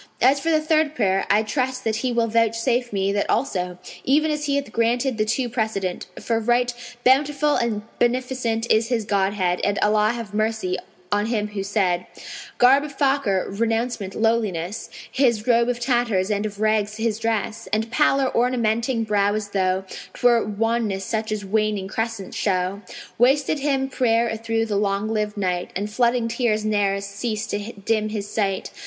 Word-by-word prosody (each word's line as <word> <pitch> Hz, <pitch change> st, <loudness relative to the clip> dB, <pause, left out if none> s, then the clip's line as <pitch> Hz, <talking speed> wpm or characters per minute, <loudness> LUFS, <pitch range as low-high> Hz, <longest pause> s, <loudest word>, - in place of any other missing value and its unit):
As 270 Hz, +3 st, +4 dB
for 330 Hz, -, -2 dB
the 315 Hz, -1 st, +4 dB
third 310 Hz, -1 st, +1 dB
prayer, 195 Hz, -5 st, +1 dB
I 210 Hz, +2 st, +4 dB
trust 255 Hz, +3 st, -2 dB
that 220 Hz, -1 st, 0 dB
He 250 Hz, +2 st, -1 dB
will 235 Hz, -1 st, +2 dB
vouchsafe 230 Hz, +2 st, +1 dB
me 195 Hz, -1 st, 0 dB
that 205 Hz, -, -1 dB
also, 180 Hz, -8 st, -1 dB, 0.3 s
even 305 Hz, +3 st, +2 dB
as 300 Hz, 0 st, -2 dB
He 280 Hz, -1 st, 0 dB
hath 280 Hz, -5 st, -2 dB
granted 235 Hz, +2 st, 0 dB
the 215 Hz, -, +2 dB
two 245 Hz, +3 st, 0 dB
precedent, 220 Hz, -6 st, -2 dB
for 230 Hz, -1 st, 0 dB
right 240 Hz, +2 st, +1 dB, 0.3 s
Bountiful 290 Hz, +3 st, +3 dB
and 220 Hz, -3 st, -1 dB, 0.2 s
Beneficent 240 Hz, -2 st, 0 dB
is 220 Hz, +1 st, +3 dB
His 230 Hz, -3 st, -1 dB
Godhead, 195 Hz, -3 st, 0 dB
and 205 Hz, 0 st, +1 dB
Allah 210 Hz, +1 st, +3 dB
have 230 Hz, -3 st, -7 dB
mercy 215 Hz, -3 st, 0 dB, 0.4 s
on 205 Hz, +1 st, +1 dB
him 215 Hz, -3 st, -1 dB
who 205 Hz, -1 st, -4 dB
said:[FN#506] 190 Hz, -3 st, -3 dB
Garb 265 Hz, +3 st, +6 dB
of 300 Hz, -2 st, -7 dB
Fakir, 270 Hz, -9 st, +1 dB
renouncement, 225 Hz, -1 st, -1 dB
lowliness; 220 Hz, -4 st, -1 dB, 0.2 s
His 235 Hz, -5 st, +2 dB
robe 235 Hz, -1 st, +3 dB
of 245 Hz, -1 st, -1 dB
tatters 240 Hz, -6 st, +1 dB
and 205 Hz, +1 st, 0 dB
of 205 Hz, -1 st, -10 dB
rags 215 Hz, -1 st, +1 dB
his 225 Hz, -1 st, -1 dB
dress; 225 Hz, -1 st, -2 dB
And 220 Hz, +2 st, -1 dB
pallor 275 Hz, -1 st, +2 dB
ornamenting 235 Hz, -1 st, +1 dB
brow 205 Hz, -1 st, +1 dB
as 215 Hz, -1 st, -3 dB
though 190 Hz, -1 st, 0 dB, 0.3 s
'Twere 240 Hz, -3 st, +3 dB
wanness 215 Hz, -2 st, -1 dB
such 220 Hz, -1 st, -2 dB
as 210 Hz, -2 st, -3 dB
waning 210 Hz, -1 st, 0 dB
crescents 225 Hz, -1 st, -4 dB
show. 190 Hz, 0 st, -1 dB, 0.4 s
Wasted 275 Hz, +4 st, +3 dB
him 270 Hz, -1 st, 0 dB
prayer 235 Hz, -3 st, +1 dB
a 220 Hz, -, -2 dB
through 225 Hz, 0 st, -1 dB
the 210 Hz, -3 st, -1 dB
long 200 Hz, +1 st, 0 dB
lived 210 Hz, -1 st, -2 dB
night, 180 Hz, -3 st, -1 dB
And 205 Hz, +2 st, -3 dB
flooding 240 Hz, +1 st, +2 dB
tears 230 Hz, -2 st, 0 dB
ne'er 200 Hz, -2 st, +1 dB
cease 210 Hz, +2 st, -3 dB
to 210 Hz, +1 st, -4 dB
dim 215 Hz, +2 st, -1 dB
his 210 Hz, -2 st, -4 dB
sight. 195 Hz, -3 st, -2 dB
225 Hz, 175 wpm, -23 LUFS, 205-245 Hz, 0.4 s, Garb